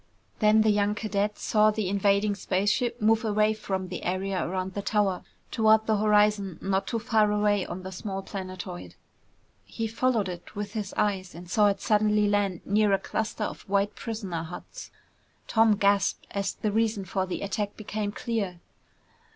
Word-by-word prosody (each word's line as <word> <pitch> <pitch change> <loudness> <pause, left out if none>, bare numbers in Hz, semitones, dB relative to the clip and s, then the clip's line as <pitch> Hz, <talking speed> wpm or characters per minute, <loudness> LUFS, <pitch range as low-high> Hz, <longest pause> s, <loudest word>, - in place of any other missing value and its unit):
Then 215 0 +5
the 215 0 +4
young 205 0 +1
cadet 210 -1 -1
saw 215 0 +3
the 215 -2 -1
invading 200 +1 +2
spaceship 205 +5 0
move 220 +1 +3
away 215 0 +2
from 190 -3 -3
the 180 - -5
area 185 +1 -1
around 185 +1 -3
the 200 - -3
tower 200 -3 +1 0.3
toward 220 -1 +4
the 220 -1 +2
horizon 210 -3 +2
not 195 0 -1
too 230 - -1
far 220 -2 +2
away 205 -2 +1
on 180 +2 -6
the 190 - -6
small 195 +1 -5
planetoid. 185 -2 -7 0.7
He 225 - -4
followed 225 -1 +1
it 175 -1 -8
with 205 0 -5
his 210 -3 -3
eyes 190 -4 0
and 175 +1 -10
saw 205 +4 +4
it 200 -1 0
suddenly 210 -1 +3
land 200 -3 0
near 210 +1 +3
a - - +5
cluster 220 +3 -3
of - - -4
white 200 +1 +1
prisoner 205 -8 -4
huts. 175 - -9 0.6
Tom 225 -1 +4
gasped 200 -1 +2
as 200 -1 -2
the 215 - -2
reason 220 -2 0
for 190 +1 -2
the 180 - -4
attack 205 +1 -3
became 210 -1 -3
clear. 205 -6 -3
205 Hz, 170 wpm, -27 LUFS, 190-215 Hz, 0.7 s, Then